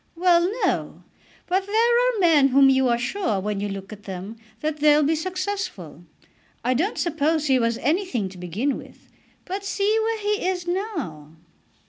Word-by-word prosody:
"Well; 350 +1 +3
no; - - -2 0.4
but 380 +2 0
there 460 +3 +3 0.2
are - - -3
men 325 -6 +5
of 270 - +2
whom 270 0 +6
you 265 -1 +3
are 235 -1 +2
sure, 245 - -1
when 205 +1 -3
you 205 0 -2
look 195 +1 -7
at 205 0 -13
them, 190 +3 -6 0.3
that 310 0 -2
they'll 300 0 +4
be 300 +3 +2
successful. 365 - -4 0.6
I 250 +2 +2
don't 345 - -1
suppose 315 -1 0
he 265 -3 +3
was 230 -1 0
anything 295 - -1
to 185 -1 -13
begin 205 - -2
with, - - -15 0.4
but 390 +2 -4
see 400 +2 +1
where 450 0 0
he 415 0 -1
is 360 -2 -2
now!" 320 - -4
300 Hz, 175 wpm, -23 LUFS, 230-375 Hz, 0.6 s, whom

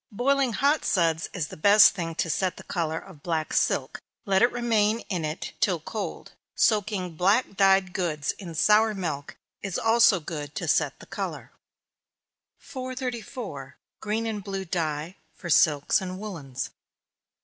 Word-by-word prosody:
Boiling 260 +3 +1
hot 285 +7 +2
suds 165 -3 +1
is 165 -6 -3
the - - -9
best 205 +6 +7
thing 165 -4 -4
to 165 - -1
set 185 +3 -1
the - - -10
color 160 -2 -2
of 170 -4 -11
black 160 -1 -2
silk - - 0 0.3
let 195 -2 +2
it 240 - +5
remain 225 -2 +1
in 180 -6 -2
it 155 +1 -4
till - - +1
cold. - - -6 0.2
Soaking 205 -5 +1
black 200 +5 +2
dyed 195 -1 +4
goods 155 -5 -1
in 175 -5 -8
sour 215 +5 +4
milk, 155 -7 -4 0.2
is 195 -3 -3
also 225 -3 +4
good 150 -2 -6
to - - -3
set - - +1
the - - -12
color. - - -6 1.1
434. 250 - -6 0.2
_Green 220 +2 -1
and 210 -3 -4
Blue 195 -1 -4
Dye, 165 0 -3 0.2
for 175 -3 -6
Silks 150 +5 +4
and 185 -1 -5
Woollens. 165 -11 -6
190 Hz, 150 wpm, -26 LUFS, 165-215 Hz, 1.1 s, best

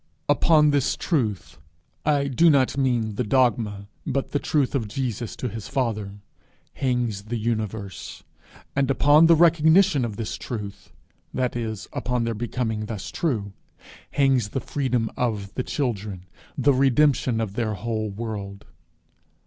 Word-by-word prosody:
Upon 150 -3 +4
this 145 -2 +1
truth 110 - -2 0.5
I 145 -2 +2
do 165 +6 +4
not 135 -4 +3
mean 120 -6 0
the 125 - +1
dogma, 110 -4 +1 0.2
but 135 - -2
the 145 - +1
truth 140 -4 +1
itself 130 -6 -1
of - - -9
Jesus 120 -2 -3
to 125 - -3
his 110 -2 -6
father 105 -6 -2 0.5
hangs 120 -6 -1
the 120 +2 -3
universe; 110 -3 -4 0.5
and 140 -1 +1
upon 145 +4 +5
the 165 - +7
recognition 160 -1 +5
of 110 -3 -3
this 110 0 -4
truth 105 -4 -7 0.4
that 125 -2 -1
is, 110 -4 -4
upon 125 -1 -1
their 115 0 -1
becoming 110 -1 -3
thus 105 -4 -6
true 110 - -2 0.6
hangs 135 -6 +2
the 135 - -2
freedom 125 -5 -1
of 105 -5 -2
the - - -2
children, 105 -10 -3 0.3
the 140 +1 +4
redemption 135 -2 +3
of 110 -3 -2
their 110 -1 -1
whole 110 +1 -3
world. 100 -2 -6
120 Hz, 145 wpm, -24 LUFS, 105-135 Hz, 0.6 s, the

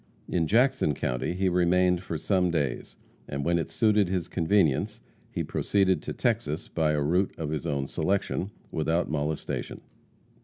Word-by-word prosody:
In 85 -3 0
Jackson 120 - +3
county 60 +6 -2
he 95 +1 +1
remained 90 0 +3
for 85 -3 -4
some 90 +3 +1
days, 75 -7 -2 0.3
and 70 0 -3
when 85 0 +2
it 80 - -3
suited 105 -3 +3
his 90 -2 -1
convenience 85 -5 +1 0.3
he - - -3
proceeded 95 -2 +1
to - - -5
Texas 110 - -1
by 80 -2 +1
a 75 - +1
route 90 +6 +1
of 75 -2 -3
his 80 +2 -3
own 70 -3 -1
selection, 100 +1 -1 0.2
without 80 +1 0
molestation. 75 0 -3
85 Hz, 155 wpm, -27 LUFS, 75-95 Hz, 0.3 s, Jackson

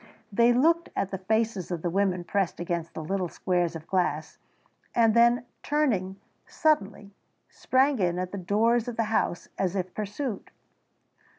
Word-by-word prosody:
They 235 +4 +4
looked 330 +8 +3
at 195 - -1
the 190 - -4
faces 220 -1 0
of 175 -3 -4
the 175 - 0
women 185 -1 +1
pressed 195 -1 -1
against 170 -1 -3
the 160 - -5
little 185 +2 -2
squares 175 -2 -1
of 160 -1 -8
glass 165 -5 -1 0.6
and 225 -2 +4
then, 235 +1 +4 0.2
turning, 215 -11 0 0.3
suddenly, 205 -9 0 0.4
sprang 265 0 +1
in 175 -2 +1
at 185 0 -3
the 200 - -5
doors 225 +6 +2
of 240 - -5
the 230 - +2
houses 175 - 0
as 185 0 0
if 185 -1 -3
pursued. 215 +2 -4
200 Hz, 160 wpm, -27 LUFS, 180-235 Hz, 0.6 s, They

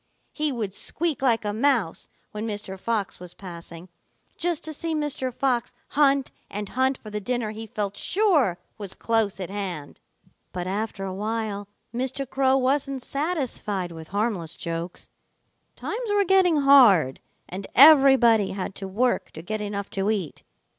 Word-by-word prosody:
He 305 -1 0
would 220 -7 -3
squeak 315 +4 -2
like 235 -5 +2
a 205 - -1
mouse 230 -7 +1 0.2
when 215 +1 -4
Mr. 205 -3 -5
Fox 215 -2 -2
was 180 -1 -10
passing, 170 -2 -10 0.5
just 345 -3 -1
to 315 - -5
see 325 +2 -3
Mr. 295 -4 -2
Fox 245 -1 -1
hunt 275 -2 +3 0.2
and 205 0 -5
hunt 260 +1 +1
for 215 - -11
the 210 - -2
dinner 240 0 -2
he 220 +1 -7
felt 205 -1 -3
sure 315 - +2 0.2
was 200 -3 -6
close 225 -4 0
at 185 -1 -5
hand. 185 -8 -5 0.5
"But 180 -1 -3
after 200 +1 -3
a 190 - -4
while 210 0 -3 0.3
Mr. 260 +3 -2
Crow 265 0 +2
wasn't 270 0 0
satisfied 260 - -2
with 160 -1 -9
harmless 200 -5 -2
jokes. 170 +1 -5 0.7
Times 460 +1 -4
were 410 -1 +3
getting 360 -5 +4
hard, 225 - +6 0.3
and 190 +2 -6
everybody 265 -8 +7
had 195 0 -4
to 195 - -5
work 240 +6 0
to 160 - -9
get 215 +4 -3
enough 200 -1 -4
to 195 +1 -1
eat. 195 -9 -2
220 Hz, 155 wpm, -25 LUFS, 195-275 Hz, 0.7 s, everybody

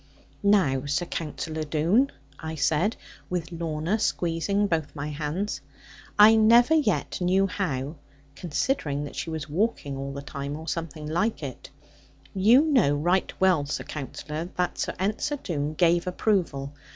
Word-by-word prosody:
'Now, 160 -10 +3
Sir 150 +5 0
Counsellor 160 -1 -4
Doone,' 165 - +2 0.3
I 160 0 -5
said, 160 +7 +1 0.3
with 175 -1 -3
Lorna 165 +4 -2
squeezing 185 +2 0
both 160 -6 -1
my 145 0 -4
hands, 155 +7 -3 0.6
I 210 +2 +9
never 235 +6 +6
yet 255 - +1
knew 185 +2 +3
how 155 -7 -3 0.4
(considering 155 - -1
that 145 - -7
she - - -4
was 160 -2 -4
walking 155 -4 -1
all 135 0 -4
the 140 0 -6
time, 140 0 -5
or 160 +1 -9
something 165 -2 -4
like 170 +5 -1
it); 130 -3 -7 0.6
'you 220 +8 +6
know 250 - +3
right 175 +6 +1
well, 180 -7 +3
Sir - - -3
Counsellor, 150 +2 -5
that 180 -1 -1
Sir - - -2
Ensor 215 - -1
Doone 155 - -3
gave 175 +2 +3
approval.' 175 -8 0
165 Hz, 145 wpm, -26 LUFS, 150-200 Hz, 0.6 s, I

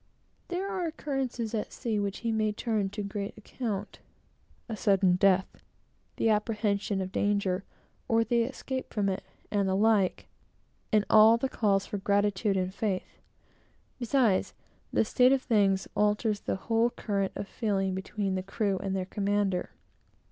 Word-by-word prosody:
There 365 +2 -2
are 370 -4 -2
occurrences 265 -7 -3
at 215 - -2
sea 225 -4 -2
which 200 -1 -3
he 230 -1 -1
may 215 -1 +1
turn 210 -3 -1
to 205 +1 -5
great 200 0 -5
account, 210 -2 -5 0.7
a 225 - -4
sudden 195 -3 +3
death, 190 0 +2 0.5
the - - +1
apprehension 210 -2 0
of 185 0 -4
danger, 200 -2 0 0.4
or 230 0 +3
the 235 +1 +2
escape 260 +2 -4
from 205 -2 0
it, 190 0 -3 0.3
and 200 -2 +1
the 190 - +1
like; 205 -2 +2 0.6
and 215 -1 +3
all 220 +1 +7
the 265 - -1
calls 200 -5 +1
for 205 - -4
gratitude 200 0 +1
and 185 0 -1
faith. 200 -2 -3 0.8
Besides, 240 -5 +2 0.4
this 220 - +1
state 250 +1 +5
of 270 -1 +1
thing 200 -5 +3 0.2
alters 210 0 +1
the - - -2
whole 225 +4 +1
current 200 -5 -2
of 200 - -5
feeling 195 -4 -1
between 190 +1 -2
the 185 - -1
crew 195 0 -1
and 195 -1 -2
their 185 -1 -1
commander. 200 -1 0
205 Hz, 155 wpm, -29 LUFS, 195-225 Hz, 0.8 s, all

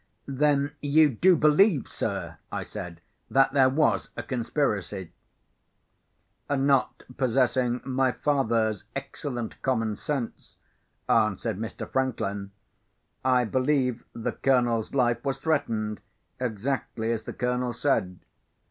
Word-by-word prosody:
"Then 140 +1 +1
you 150 +1 +5
do 180 +10 +4
believe, 155 - +4
sir," - - -4
I - - -3
said, 85 -1 -8 0.3
"that 135 0 +3
there 135 -2 +5
was 150 +3 +1
a - - -3
conspiracy?" 115 - -2 1.4
"Not 140 -1 +2
possessing 125 -1 +1
my 130 -1 +1
father's 115 -8 0
excellent 135 -3 -5
common 115 -5 0
sense," 135 -1 -4 0.5
answered 110 -3 +1
Mr. 110 0 -5
Franklin, 100 -7 -2 0.7
"I 125 -1 +3
believe 130 0 +1
the 115 - -2
Colonel's 120 -3 +1
life 120 -3 +2
was 135 -2 -1
threatened, 115 -9 -1 0.4
exactly 115 -1 -2
as 115 -2 -1
the - - -5
Colonel 125 0 -1
said. 105 -9 0
125 Hz, 110 wpm, -27 LUFS, 115-140 Hz, 1.4 s, you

